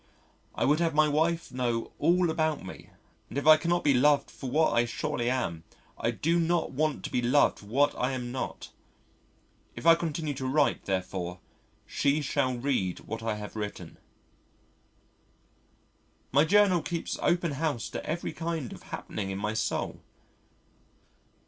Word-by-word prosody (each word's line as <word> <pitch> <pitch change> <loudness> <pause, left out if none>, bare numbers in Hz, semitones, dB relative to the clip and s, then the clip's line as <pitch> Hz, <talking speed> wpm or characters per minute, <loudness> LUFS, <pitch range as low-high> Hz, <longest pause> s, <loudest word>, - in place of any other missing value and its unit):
I - - +1
would 150 +3 +3
have 165 -3 +1
my 155 0 +5
wife 165 +3 0
know 120 -2 -2
all 175 -1 +3
about 155 - -1
me 95 - -10 0.4
and - - -6
if 140 - -2
I 155 0 +10
cannot 170 +2 0
be 145 - +4
loved 140 +3 +3
for 130 - -7
what 155 +5 +3
I 120 +1 +4
surely 120 0 -2
am, 90 -11 -2 0.3
I - - -1
do 170 +2 +1
not 170 0 +1
want 155 +2 -1
to - - -5
be 125 - +1
loved 130 +4 +3
for 100 - -14
what 140 +7 +2
I 125 +2 -1
am 125 -2 -4
not. 130 - -5 1.0
If - - -8
I 165 - +9
continue 160 -2 -2
to 130 -1 -4
write 145 +2 +1
therefore 90 -1 -3 0.5
she 140 +2 +1
shall 130 -3 0
read 120 -9 -1
what 110 +1 -6
I 110 -1 -1
have 105 0 -8
written.... 105 -1 -6 2.3
My 145 +4 +5
Journal 195 -2 +4
keeps 170 +1 -4
open 175 -2 +1
house 145 -4 -2
to - - -5
every 170 +3 -3
kind 165 -6 -4
of - - -11
happening 100 -2 -5
in 95 - -3
my 105 +2 -2
soul. 110 - -2
140 Hz, 160 wpm, -28 LUFS, 120-160 Hz, 2.3 s, I